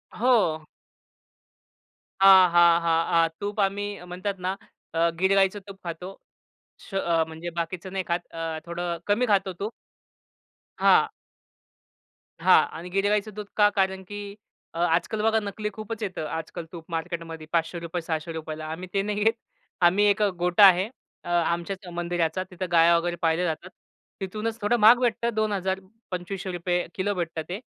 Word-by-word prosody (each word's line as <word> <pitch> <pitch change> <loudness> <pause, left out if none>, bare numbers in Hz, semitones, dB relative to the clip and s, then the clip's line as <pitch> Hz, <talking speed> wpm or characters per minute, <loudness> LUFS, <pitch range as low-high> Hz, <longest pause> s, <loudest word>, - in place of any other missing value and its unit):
हो. 210 -11 +2 1.6
हां, 190 -2 +8
हां, 170 -1 +6
हां, 165 0 +2
हां, 165 0 +4
तूप 205 +1 -4
आम्ही 200 +1 0 0.2
म्हणतात 185 +2 -4
ना 185 - +1 0.4
अ, 165 +1 +3
गीर 190 +1 +3
गाईचं 195 +1 +3
तूप 195 -1 -10
खातो. 180 +3 -6 0.7
श - - -16
अ, 170 -4 +2
म्हणजे 160 +2 -6
बाकीचं 180 +3 -4
नाही 190 -1 -1
खात. 170 0 +1
अ, 165 -1 -4
थोडं 170 0 -3
कमी 210 +5 +2
खातो 195 -2 +2
तूप. 210 +3 -3 1.1
हां. - - +5 1.3
हां - - +7 0.2
आणि 175 +2 -8
गीर 195 +2 +1
गाईचं 210 0 0
दूध 210 -1 -5
का? 205 -1 +6
कारण 190 -1 0
की 205 0 -7 0.4
अ, 165 - -6
आजकल 175 +5 +1
बघा 220 +1 +3
नकली 210 0 -4
खूपच 215 +1 -6
येतं. 185 -6 -4
आजकल 160 +2 -5
तूप 165 -2 -9
मार्केटमध्ये 165 -1 -5
₹500, 170 +1 -1
₹600. 160 -1 -4
आम्ही 180 +3 -6
ते 195 - +2
नाही 205 +1 -2
घेत. 225 +1 +4 0.5
आम्ही 185 +4 +5
एक 205 +1 +1 0.2
गोठा 180 +3 +6
आहे 185 +1 +6 0.4
अ, - - -8
आमच्याच 175 +3 -1
मंदिराचा. 175 0 -1
तिथे 185 +1 -4
गाया 170 0 +6
वगैरे 175 +1 -1
पाळल्या 165 +2 +2
जातात. 165 +2 -3 0.5
तिथूनच 215 +4 -4
थोडं 225 +4 +2
महाग 225 +3 +7
भेटत 240 -2 0
2,000 200 -3 -1 0.3
₹2,500 180 -1 -2
किलो 205 +2 0
भेटत 170 -2 -3
ते. 185 +3 -4
180 Hz, 150 wpm, -26 LUFS, 170-200 Hz, 1.6 s, हां